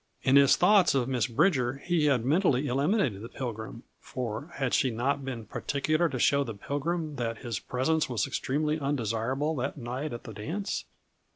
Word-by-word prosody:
In 130 Hz, -, +4 dB
his 140 Hz, -1 st, +7 dB
thoughts 200 Hz, -7 st, +5 dB
of 125 Hz, -2 st, +1 dB
Miss 125 Hz, -4 st, 0 dB
Bridger 130 Hz, -1 st, +2 dB
he 160 Hz, +3 st, 0 dB
had 130 Hz, -5 st, +2 dB
mentally 150 Hz, -2 st, +2 dB
eliminated 140 Hz, -, +1 dB
the 115 Hz, -, -8 dB
Pilgrim; 115 Hz, -2 st, -6 dB, 0.2 s
for 125 Hz, +4 st, -5 dB
had 135 Hz, -3 st, -1 dB
she 130 Hz, -, +3 dB
not 135 Hz, +5 st, -1 dB
been 125 Hz, -4 st, -5 dB
particular 155 Hz, +8 st, 0 dB
to 135 Hz, -, -3 dB
show 140 Hz, +3 st, +3 dB
the 115 Hz, -5 st, -6 dB
Pilgrim 150 Hz, -, -3 dB
that 115 Hz, -2 st, -2 dB
his 115 Hz, -5 st, -3 dB
presence 150 Hz, +4 st, 0 dB
was 115 Hz, -6 st, 0 dB
extremely 150 Hz, +3 st, -1 dB
undesirable, 135 Hz, +2 st, -1 dB
that 130 Hz, +4 st, -3 dB
night 130 Hz, +4 st, -4 dB
at 120 Hz, -, -6 dB
the 110 Hz, -, -8 dB
dance? 165 Hz, -, -4 dB
135 Hz, 175 wpm, -28 LUFS, 120-150 Hz, 0.2 s, his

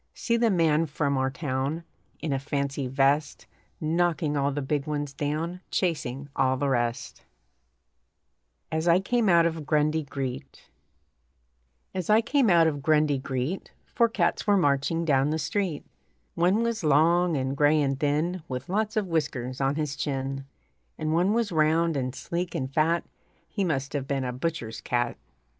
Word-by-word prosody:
See 235 Hz, -, 0 dB
the 235 Hz, 0 st, +3 dB
man 165 Hz, -4 st, +2 dB
from 145 Hz, -1 st, -1 dB
our 130 Hz, 0 st, +1 dB
town. 135 Hz, +3 st, -3 dB, 0.4 s
In 150 Hz, -, -1 dB
a 135 Hz, -, 0 dB
fancy 140 Hz, -1 st, -2 dB
vest, 140 Hz, +3 st, +1 dB, 0.3 s
Knocking 160 Hz, -1 st, 0 dB
all 140 Hz, 0 st, +1 dB
the 145 Hz, 0 st, -3 dB
big 145 Hz, +1 st, -1 dB
ones 145 Hz, -2 st, -3 dB
down, 155 Hz, +5 st, -3 dB
Chasing 145 Hz, -6 st, -2 dB
all 130 Hz, 0 st, +2 dB
the 140 Hz, +1 st, 0 dB
rest. 120 Hz, -2 st, -2 dB, 1.5 s
AS 160 Hz, +1 st, -1 dB
I 170 Hz, +1 st, +5 dB
CAME 225 Hz, +2 st, +1 dB
OUT 170 Hz, -1 st, +5 dB
OF 165 Hz, -2 st, -1 dB
GRUNDY 155 Hz, +1 st, +2 dB
GREET 135 Hz, 0 st, -6 dB, 1.3 s
As 185 Hz, -3 st, -4 dB
I 215 Hz, +1 st, +6 dB
came 245 Hz, +1 st, +2 dB
out 170 Hz, -2 st, +6 dB
of 145 Hz, -3 st, 0 dB
Grundy 150 Hz, -1 st, +2 dB
Greet 135 Hz, +7 st, -3 dB
Four 235 Hz, -1 st, +2 dB
cats 225 Hz, -, 0 dB
were 205 Hz, -1 st, +5 dB
marching 155 Hz, +1 st, +1 dB
down 140 Hz, -2 st, +3 dB
the 155 Hz, -, 0 dB
street 180 Hz, -1 st, -2 dB, 0.5 s
One 185 Hz, +6 st, +2 dB
was 235 Hz, -4 st, -2 dB
long 165 Hz, +3 st, +3 dB
and 130 Hz, +1 st, -1 dB
gray 150 Hz, +2 st, +4 dB
and 135 Hz, -2 st, 0 dB
thin 155 Hz, +5 st, 0 dB
With 130 Hz, +2 st, -5 dB
lots 215 Hz, +3 st, -1 dB
of 210 Hz, -, +1 dB
whiskers 140 Hz, -7 st, -2 dB
on 135 Hz, +1 st, +1 dB
his 150 Hz, -2 st, -2 dB
chin, 135 Hz, -1 st, -3 dB, 0.5 s
And 155 Hz, 0 st, -1 dB
one 180 Hz, +4 st, +3 dB
was 225 Hz, -2 st, 0 dB
round 160 Hz, +1 st, +2 dB
and 130 Hz, -1 st, -2 dB
sleek 175 Hz, +4 st, -4 dB
and 130 Hz, 0 st, -3 dB
fat 165 Hz, +3 st, +2 dB, 0.4 s
(He 200 Hz, -, -2 dB
must 140 Hz, -6 st, -1 dB
have 140 Hz, -2 st, -2 dB
been 140 Hz, -1 st, -1 dB
a 125 Hz, -1 st, -3 dB
butcher's 120 Hz, -6 st, -4 dB
cat). 120 Hz, 0 st, -1 dB
150 Hz, 165 wpm, -27 LUFS, 135-170 Hz, 1.5 s, I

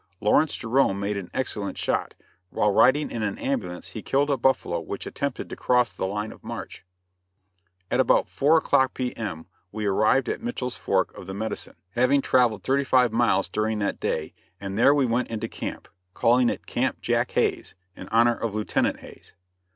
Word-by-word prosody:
Lawrence 145 Hz, +9 st, +3 dB
Jerome 115 Hz, -4 st, +1 dB
made 100 Hz, +1 st, -2 dB
an 95 Hz, -3 st, -5 dB
excellent 105 Hz, -6 st, -3 dB
shot; -, -, -1 dB, 0.3 s
while 105 Hz, -, +1 dB
riding 135 Hz, +8 st, +4 dB
in 115 Hz, -, -3 dB
an 105 Hz, -2 st, -2 dB
ambulance 100 Hz, -11 st, -3 dB
he 110 Hz, -, -7 dB
killed 145 Hz, +5 st, +1 dB
a -, -, +3 dB
buffalo 120 Hz, -9 st, +1 dB
which 85 Hz, +4 st, -6 dB
attempted 140 Hz, -2 st, -4 dB
to -, -, -7 dB
cross 125 Hz, -2 st, +2 dB
the 95 Hz, -, -3 dB
line 105 Hz, +2 st, -3 dB
of -, -, -15 dB
march. -, -, -7 dB, 1.1 s
At -, -, +1 dB
about -, -, +3 dB
four 155 Hz, +4 st, +3 dB
o'clock 135 Hz, -4 st, +2 dB
P.M., 110 Hz, -10 st, -4 dB, 0.3 s
we 110 Hz, 0 st, -4 dB
arrived 110 Hz, +6 st, +2 dB
at -, -, -3 dB
Mitchell's 135 Hz, -, -4 dB
Fork 95 Hz, -1 st, 0 dB
of 90 Hz, -, -10 dB
the 95 Hz, -, -6 dB
Medicine, 110 Hz, +2 st, -5 dB, 0.2 s
having 125 Hz, +6 st, +3 dB
traveled 120 Hz, -6 st, +2 dB
thirty 140 Hz, +1 st, +1 dB
five 125 Hz, -4 st, +3 dB
miles 120 Hz, 0 st, +2 dB
during 110 Hz, 0 st, -1 dB
that 100 Hz, -1 st, -2 dB
day, 80 Hz, 0 st, -2 dB, 0.3 s
and 100 Hz, -1 st, -5 dB
there 130 Hz, +6 st, +5 dB
we 140 Hz, -2 st, +3 dB
went 120 Hz, +1 st, 0 dB
into 115 Hz, 0 st, -3 dB
camp -, -, -6 dB, 0.3 s
calling 120 Hz, +1 st, +4 dB
it -, -, -5 dB
Camp -, -, -1 dB
Jack -, -, 0 dB
Hayes, -, -, 0 dB, 0.2 s
in 95 Hz, -, -10 dB
honor 115 Hz, +2 st, +3 dB
of 115 Hz, -3 st, -4 dB
Lieutenant 105 Hz, 0 st, 0 dB
Hayes. -, -, -15 dB
115 Hz, 180 wpm, -25 LUFS, 100-130 Hz, 1.1 s, there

